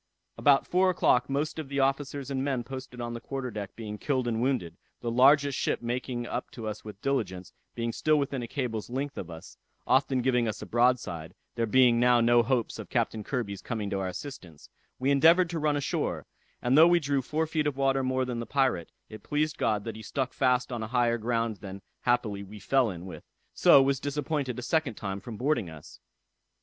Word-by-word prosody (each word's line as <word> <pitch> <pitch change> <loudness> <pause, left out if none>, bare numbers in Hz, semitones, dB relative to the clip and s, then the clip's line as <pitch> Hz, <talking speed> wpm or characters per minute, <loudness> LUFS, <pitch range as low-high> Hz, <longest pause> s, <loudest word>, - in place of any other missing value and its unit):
"About 140 -1 +4
four 185 +1 +3
o'clock 125 -8 +2
most 145 +3 -1
of 150 -4 -6
the 140 0 -2
officers 135 0 -1
and 135 -1 -1
men 135 -3 -1
posted 130 0 -8
on 120 0 -4
the 120 - -6
quarter 135 -2 -4
deck 105 -3 -6
being 105 -2 -7
killed 130 -4 0
and 115 -1 -1
wounded, 120 -11 -1 0.3
the 120 - -2
largest 140 +3 +4
ship - - -1
making 120 0 -3
up - - -4
to 115 - -8
us 105 0 -5
with 105 -2 -10
diligence, 95 -10 -2 0.2
being 115 0 -2
still 155 +5 +2
within 140 -2 -1
a 120 - -5
cable's 115 -5 -3
length 135 +3 -3
of 90 - -6
us, 80 -1 -11 0.3
often 130 -1 +2
giving 125 -2 +2
us 110 - -3
a - - -7
broadside; 110 -9 0 0.2
there 115 -1 -1
being 120 0 +5
now 125 0 +5
no 120 +1 +5
hopes 120 0 -1
of - - -8
Captain 110 -1 -1
Kirby's 100 -6 -3
coming 110 -4 -4
to 95 - -1
our 95 - -2
assistance, 90 - -9 0.3
we 135 +2 +1
endeavored 165 +5 +5
to 165 - -2
run 150 -1 +1
a - - -2
shore; - - -2 0.4
and 125 +2 +3
though 160 +3 +8
we 175 0 +5
drew 140 -3 0
four 155 +5 -1
feet 155 -1 -1
of 140 -2 -2
water 135 0 +2
more 130 0 0
than 125 -2 -4
the 115 - -5
pirate, 130 -11 0 0.2
it 110 -1 -10
pleased 150 0 -1
God 105 -2 +1
that 115 -1 -5
he 110 - -8
stuck 130 +3 -3
fast 125 -1 +1
on 120 -2 -3
a 110 - -3
higher 120 0 +1
ground 115 -1 -1
than 95 0 -9 0.2
happily 110 -5 0
we 100 +2 -10
fell 130 +1 +2
in 90 -2 -7
with; 95 - -9 0.3
so 135 - +7
was 135 -1 +1
disappointed 145 -2 -2
a 125 - -5
second 155 -5 0
time 100 -1 -4
from 110 0 -8
boarding 125 - 0
us. 80 +2 -12
125 Hz, 215 wpm, -28 LUFS, 110-140 Hz, 0.4 s, though